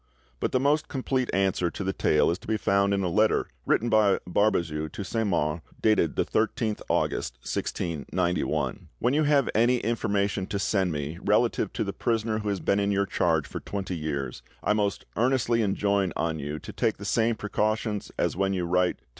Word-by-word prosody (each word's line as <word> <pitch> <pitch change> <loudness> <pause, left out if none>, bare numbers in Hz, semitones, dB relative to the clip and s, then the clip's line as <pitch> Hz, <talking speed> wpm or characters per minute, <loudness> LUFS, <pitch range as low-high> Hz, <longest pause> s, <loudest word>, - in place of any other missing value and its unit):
But - - -1
the 130 - +2
most 145 +3 +2
complete 130 -1 -1
answer 95 -2 +1
to 95 - -5
the 95 0 -1
tale 75 -2 +3
is 85 - -3
to - - -15
be 110 0 +1
found 100 -1 +2
in 100 -1 +1
a - - +1
letter 105 +5 +2 0.2
written 120 - +2
by 110 -3 +4
Barbezieux 85 -6 +1
to 100 - -5
Saint 110 +3 -1
Mars, 80 -3 0 0.2
dated 105 -7 +2
the - - +1
13th 110 0 0
August - - 0
1691:— 85 +2 -2
"When 120 +3 +1
you 155 +1 +3
have 145 -3 +3
any 120 +3 +4
information 100 -4 -1
to 100 - -2
send 95 -2 +1
me 75 +2 -4
relative - - +2
to - - -1
the - - -4
prisoner 110 -2 0
who 105 -1 -3
has 100 -2 -1
been 100 - +1
in 100 0 +1
your 100 0 +2
charge 80 -4 +1
for - - -6
twenty 95 -2 -4
years, 70 -5 -3 0.2
I - - +3
most 105 -3 -1
earnestly 120 -1 +2
enjoin 100 -2 +1
on 80 -1 -1
you 75 +2 -4
to - - -9
take 110 - 0
the 100 - -8
same 115 +2 +2
precautions 105 0 -1
as - - 0
when 95 +1 +1
you 90 -2 -1
write 90 +1 +1
to - - -35
M. - - -39
100 Hz, 200 wpm, -27 LUFS, 90-110 Hz, 0.2 s, by